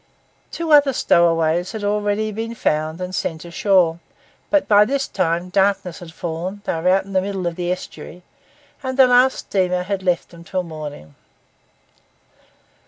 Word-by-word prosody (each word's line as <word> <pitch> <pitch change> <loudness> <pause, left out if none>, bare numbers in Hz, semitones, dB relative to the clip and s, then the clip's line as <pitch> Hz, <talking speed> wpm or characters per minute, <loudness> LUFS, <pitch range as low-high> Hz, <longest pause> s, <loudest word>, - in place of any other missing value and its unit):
Two 335 -1 -4
other 290 -2 +6
stowaways 170 -1 +2
had 220 -2 -5
already 205 +1 0
been 225 +2 -5
found 155 -4 -1
and 180 0 -5
sent 160 -3 -3
ashore; 170 -1 +2 0.5
but 300 -2 +2
by 205 -1 +6
this 275 +4 -1
time 170 +2 -1
darkness 190 -2 +1
had 175 -2 -10
fallen, 175 +4 -5
they - - -1
were 165 +2 0
out 190 +1 +3
in 195 - -10
the 190 - +3
middle 195 -1 -4
of 170 -1 -2
the 175 0 -2
estuary, 180 -1 -7 0.6
and 260 -1 -4
the 265 - +8
last 250 +1 +4
steamer 180 -2 -1
had 195 +1 -3
left 180 -2 0
them 170 -1 -14
till 185 +1 -3
the 170 - -11
morning. 145 - -8
185 Hz, 170 wpm, -20 LUFS, 170-205 Hz, 0.6 s, the